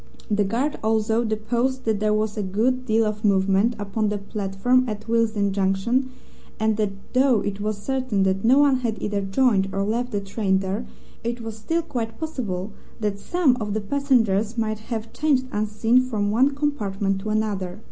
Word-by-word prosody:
The 205 0 +3
guard 245 +9 -1
also 220 +1 +1
deposed 235 +4 -1
that 220 -2 +1
there 215 0 +1
was 215 0 0
a 210 - -2
good 235 +7 0
deal 225 0 +3
of 215 0 -3
movement 200 +3 +3
upon 210 +1 -1
the 210 - -1
platform 200 +5 0
at 215 +1 -6
Willesden 220 -3 +1
Junction, 200 +7 +1 0.5
and 220 0 +2
that 210 -2 +1 0.2
though 255 -4 +4
it 205 0 -3
was 210 0 -1
certain 255 -3 -1
that 190 0 +1
no 250 +4 +5
one 285 -2 +5
had 235 -4 -2
either 205 -1 -1
joined 195 -1 +2
or 195 +1 -1
left 235 +4 -1
the 205 - 0
train 195 -1 0
there, 195 +5 -3 0.4
it 235 +1 -3
was 225 -1 -6
still 325 +10 -1
quite 235 -8 -4
possible 220 - -3 0.3
that 205 -2 -2
some 325 - +2
of 210 -2 -3
the - - +1
passengers 225 -4 +1
might 215 -1 -1
have 225 -1 -4
changed 285 -4 +1
unseen 215 +4 +2
from 215 -5 -1
one 265 +6 +3
compartment 200 -9 -1
to 215 - -4
another. 205 -4 -1
215 Hz, 180 wpm, -24 LUFS, 205-245 Hz, 0.5 s, no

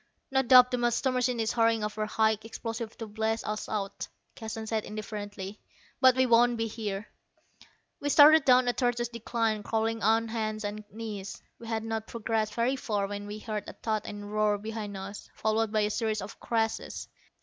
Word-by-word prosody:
"No 265 0 +4
doubt 250 0 +7
the 250 - 0
master 240 +2 +1
machine 250 -1 0
is 220 -1 +1
hurrying 230 -2 +2
over 215 0 -2
high 220 0 +2
explosives 225 0 -6
to 225 - -6
blast 220 +1 -2
us 215 0 -3
out," 200 -2 -3 0.3
Keston 220 0 -6
said 220 -1 -1
indifferently; 205 -1 -6 0.4
"but 260 -2 +6
we 260 0 +4
won't 240 0 +4
be 225 - 0
here." 215 -2 -4 0.9
We 290 - -2
started 300 +1 +8
down 255 -1 +5
a 245 - +3
tortuous 240 -2 0
decline, 230 -2 -1
crawling 225 +1 -1
on 225 +2 +3
hands 215 -1 -2
and 210 +1 -4
knees. 210 -3 -6 0.2
We 230 - -10
had 225 -1 -2
not 225 -1 -3
progressed 220 -2 -2
very 245 +3 +1
far 210 -5 -1
when 205 +1 -5
we 210 +1 -6
heard 215 -2 -4
a - - -8
thud 215 -2 -2
and 205 0 -6
a - - -8
roar 210 0 +1
behind 210 -1 -5
us, 195 +2 -8
followed 220 0 0
by 215 -1 +2
a 210 0 +1
series 220 -2 -1
of 200 - -9
crashes. 225 -1 -2
220 Hz, 190 wpm, -29 LUFS, 210-235 Hz, 0.9 s, started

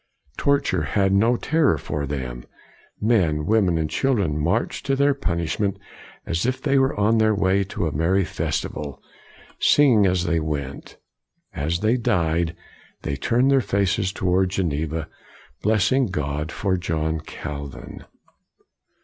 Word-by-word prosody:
Torture 140 - +1
had 95 +6 +1
no 115 +5 +3
terror 155 - +2
for 70 0 -4
them. 65 -4 -5 0.6
Men, 90 -9 +2
women, 100 -5 +2
and 80 -1 0
children 100 - 0
marched 90 +10 -1
to 135 - +2
their 140 +1 +3
punishment 95 - -2 0.5
as 85 +1 -1
if 130 +1 0
they 140 0 +2
were 135 -5 +1
on 110 +2 +3
their 110 -1 +3
way 100 0 +2
to 95 -1 -3
a 80 - -1
merry 85 +6 +1
festival, 75 -2 -4 0.6
singing 120 -9 +5
as 90 -1 +1
they 85 -2 +1
went. 70 -3 -5 0.6
As 80 +5 -2
they 110 +4 +2
died, 85 -6 0 0.5
they 70 - -2
turned 120 - +2
their 135 -1 +4
faces 100 -1 0
toward 95 0 +1
Geneva, 80 -3 -2 0.5
blessing 110 +5 +2
God 75 -2 -3
for 95 -2 -1
John 80 -2 -2
Calvin. 70 -2 -8
95 Hz, 135 wpm, -23 LUFS, 80-110 Hz, 0.6 s, singing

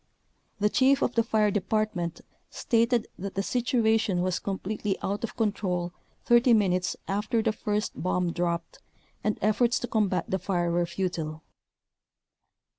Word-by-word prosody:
The 210 +1 +3
chief 270 +2 +4
of 245 - 0
the 230 - +3
fire 215 -2 +2
department 195 -4 -1 0.3
stated 235 -2 +1
that 195 +1 -5
the 195 - 0
situation 225 -5 +1
was 185 -1 0
completely 200 +1 -3
out 200 +3 -2
of 230 - -5
control 185 -6 -1 0.3
30 240 +1 +5
minutes 185 -4 +2
after 210 +3 0
the - - +2
first 210 0 -2
bomb 180 -1 0
dropped 170 -1 -2 0.4
and 215 - 0
efforts 235 +3 +3
to 245 - -2
combat 195 -7 +1
the 190 - -1
fire 175 -3 0
were 175 0 +1
futile. 165 -4 -3
205 Hz, 140 wpm, -27 LUFS, 180-225 Hz, 0.4 s, 30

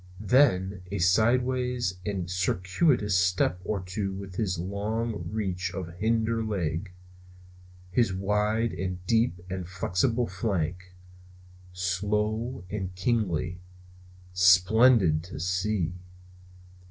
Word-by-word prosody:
Then 100 -8 +4
a - - -3
sidewise 120 +2 +1
and 95 -4 -3
circuitous 95 - +1
step 90 0 +2
or 100 -1 -2
two 95 +2 -3
with 95 -1 -8
his 95 -3 -1
long 105 +5 -3
reach 95 -4 -2
of 85 -3 -5
hinder 115 +1 +1
leg, 90 -3 -2 1.0
his 115 0 +2
wide 105 +4 0
and 90 0 -4
deep 115 -3 +1
and 95 -1 -5
flexible 105 +6 0
flank; 90 -2 -3 0.8
slow 105 +6 -1
and 95 -3 -4
kingly; 90 -4 -1 0.7
splendid 90 -1 +5
to 90 - -8
see! 90 0 -1
95 Hz, 100 wpm, -27 LUFS, 90-110 Hz, 1.0 s, splendid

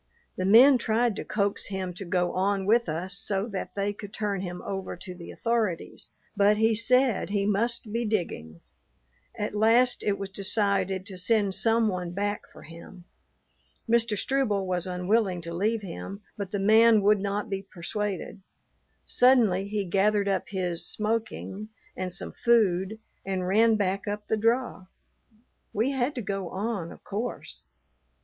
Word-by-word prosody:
The 185 - -2
men 250 +6 +8
tried 230 0 +1
to - - -4
coax 200 -1 -1
him 190 -2 -4
to 190 +3 -7
go 180 0 0
on 195 +1 0
with 230 0 +3
us 180 +4 -3
so 195 0 -1
that 190 -3 -5
they 200 0 -1
could 205 0 -10
turn 205 -3 -2
him 180 -1 -5
over 195 -1 -4
to 180 +1 -8
the 175 -1 -11
authorities, 225 -7 -2 0.3
but 205 +1 +4
he 225 +1 +3
said 250 +1 +3
he 200 -1 0
must 215 +1 -1
be 235 +1 0
digging. 165 - -3 0.8
At 210 - -3
last 230 +4 +3
it 200 -1 0
was 195 -1 -6
decided 195 -1 0
to 190 -3 -6
send 200 0 +1
some 225 +2 +2
one 180 -3 -3
back 205 +2 -3
for - - -14
him. 170 +3 -12 0.8
Mr. 230 -2 +2
Struble 215 -6 0
was 180 -1 -2
unwilling 185 +1 0
to 170 0 -7
leave 210 +5 0
him, 195 +2 -7
but 200 -2 -5
the 205 - -1
man 220 +1 +5
would 210 0 +4
not 200 +2 -2
be 195 -2 -3
persuaded. 195 +1 -5 0.6
Suddenly 225 -7 +4
he 205 -1 -2
gathered 200 +2 +2
up 195 -2 0
his 180 -4 -2
"smoking" 215 -1 -3 0.3
and 185 -1 -4
some - - -5
food 215 -4 +2 0.3
and 190 -2 -2
ran 220 +4 +4
back 195 -1 -1
up 210 0 -4
the - - +1
draw. 230 -3 0 0.9
We 225 +6 +1
had 265 +2 -1
to 245 - -4
go 195 -3 -3
on, 195 -3 -3
of - - -14
course. 215 - -5
200 Hz, 160 wpm, -27 LUFS, 190-220 Hz, 0.9 s, men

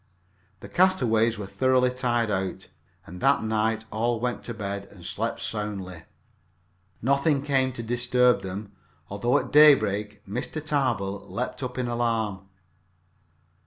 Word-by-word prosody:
The - - -9
castaways 120 -12 +2
were 105 - -5
thoroughly 125 +6 +2
tired 120 -3 0
out, 95 -1 -3 0.4
and 90 +1 -10
that 135 -3 +3
night 110 0 0
all 115 +2 0
went 125 +1 -2
to 120 - -4
bed 100 -2 -4
and 90 -4 -13
slept - - -2
soundly. 100 -5 -4 1.0
Nothing 140 +2 +2
came 135 -2 +1
to 120 - -6
disturb 120 0 +2
them, 100 +2 -6 0.4
although 120 +5 +1
at - - -3
daybreak 105 -9 +5
Mr. 125 +9 -4
Tarbill 125 -10 -1
leaped 125 +3 -4
up 125 -1 -5
in 125 -1 -1
alarm. 115 -5 -1
115 Hz, 130 wpm, -26 LUFS, 100-125 Hz, 1.0 s, daybreak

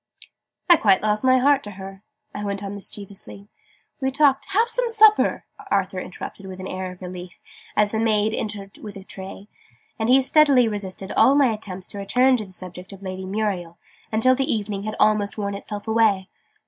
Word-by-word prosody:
"I 345 -2 +7
quite 195 -6 +3
lost 210 +1 0
my 260 0 +5
heart 280 +2 +3
to 205 - -9
her!" 195 0 -9 0.3
I 205 - -5
went 200 0 -3
on 200 0 -5
mischievously. 200 0 -9 0.5
"We 265 -1 0
talked 275 0 +2
" - - -18
"Have 445 +4 +3
some 480 +1 0
supper!" 435 -1 +5 0.2
Arthur 190 -1 0
interrupted 190 +2 -8
with 185 0 -9
an 185 - -6
air 185 -1 -5
of 180 0 -13
relief, 180 0 -9 0.3
as 210 -1 +3
the 220 - -1
maid 220 -1 +1
entered 205 -2 -5
with 210 -2 -9
the 195 - -9
tray. 195 +1 -9 0.5
And 220 +1 0
he 260 +2 +7
steadily 275 -4 +5
resisted 195 -2 -5
all 275 - +4
my 270 -5 +4
attempts 190 -4 -7
to 200 - -6
return 250 +6 +3
to 215 - -4
the 185 - -17
subject 180 0 -9
of 195 0 -12
Lady 185 0 -6
Muriel 190 -4 -3 0.3
until 225 +4 +3
the 270 +1 0
evening 205 -2 -3
had 215 - -4
almost 210 -1 +2
worn 200 -1 -2
itself 205 +1 -7
away. 220 -4 +2
205 Hz, 195 wpm, -23 LUFS, 195-240 Hz, 0.5 s, I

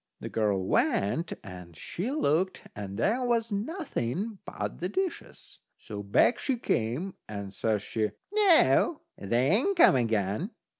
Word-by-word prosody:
The - - -6
girl 100 -4 0
went 105 - +1
and 90 -3 -10
she 185 - -4
looked, 185 - 0
and 100 -1 -6
there 225 - +1
was 235 -2 0
nothing 205 - -3
but - - -5
the 180 +3 -2
dishes. 370 - -4 0.2
So 105 -2 -7
back 100 - +3
she 265 -3 -1
came, 140 - -1 0.2
and 100 -2 -6
says 105 0 0
she: 110 -1 -1 0.2
"Noo, 375 -5 +4 0.2
they 120 +8 +1
ain't 315 - +2
come 335 - +7
again." 110 - 0
150 Hz, 140 wpm, -28 LUFS, -, 0.2 s, come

